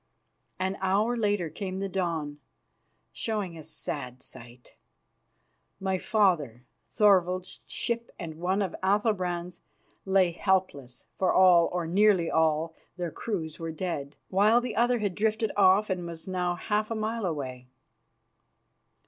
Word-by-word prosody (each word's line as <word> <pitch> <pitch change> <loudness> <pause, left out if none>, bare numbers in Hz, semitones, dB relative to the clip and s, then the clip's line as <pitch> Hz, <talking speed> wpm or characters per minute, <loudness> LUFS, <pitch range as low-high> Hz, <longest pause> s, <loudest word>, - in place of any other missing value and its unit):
An 190 +2 -2
hour 205 +5 +2
later 205 -6 0
came 185 +2 -5
the 195 +1 -2
dawn, 165 -6 -2 0.7
showing 195 - -3
a 160 - -8
sad 130 -5 -6
sight. 120 +1 -13 1.0
My 190 -1 -1
father, 155 - +1 0.2
Thorvald's, 185 -4 +2
ship 235 0 -3
and 160 -2 -7
one 190 +4 +1
of 190 - -3
Athalbrand's 185 -3 0 0.4
lay 190 -2 +3
helpless, 170 -9 -1
for 185 - +3
all, 180 -2 +6
or 175 -1 -2
nearly 185 0 +3
all, 160 0 +2 0.2
their 175 -2 -3
crews 165 -8 -4
were 165 -1 -4
dead, 155 -4 -4
while 210 +5 +4
the 245 -3 -4
other 245 +1 +3
had 205 -4 -1
drifted 220 +2 0
off 195 +1 +4
and 180 -2 -2
was 165 0 -8
now 180 -1 -1
half 210 +3 -1
a 230 - -2
mile 220 -1 -2
away. 130 -6 -5
185 Hz, 130 wpm, -28 LUFS, 165-205 Hz, 1.0 s, all